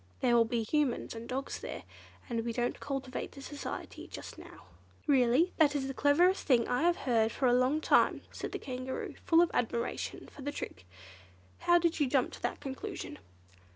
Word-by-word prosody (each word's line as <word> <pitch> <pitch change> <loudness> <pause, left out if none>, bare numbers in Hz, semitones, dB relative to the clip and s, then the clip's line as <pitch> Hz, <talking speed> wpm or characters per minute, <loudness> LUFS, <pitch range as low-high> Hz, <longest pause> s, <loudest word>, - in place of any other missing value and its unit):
There 245 -2 +4
will 230 -1 +6
be 230 0 -1
Humans 285 +1 0
and 230 0 -8
dogs 265 +2 -3
there, - - -6 0.4
and 230 -3 -2
we 235 0 -2
don't 240 +1 -1
cultivate 270 -2 -4
their 275 - -10
society 290 0 -6
just - - -8
now." - - -13 0.4
"Really 270 +4 +4
that 295 -3 +4
is 275 -2 0
the 270 - -3
cleverest 335 +8 +4
thing 245 -5 +4
I 245 - +1
have 345 +1 +4
heard 225 -3 +3
for 265 - -1
a 245 - +5
long 255 +5 +3
time," - - +3
said - - -5
the - - -3
Kangaroo, 255 0 -5
full 330 +1 +6
of 345 - -1
admiration 235 0 -2
for - - -12
the 290 +2 -3
trick. 90 - -7 0.7
"How 345 0 +5
did 340 -1 +1
you 290 - +3
jump 260 -2 +2
to - - -10
that - - -2
conclusion?" 265 -1 -6
265 Hz, 190 wpm, -32 LUFS, 240-295 Hz, 0.7 s, will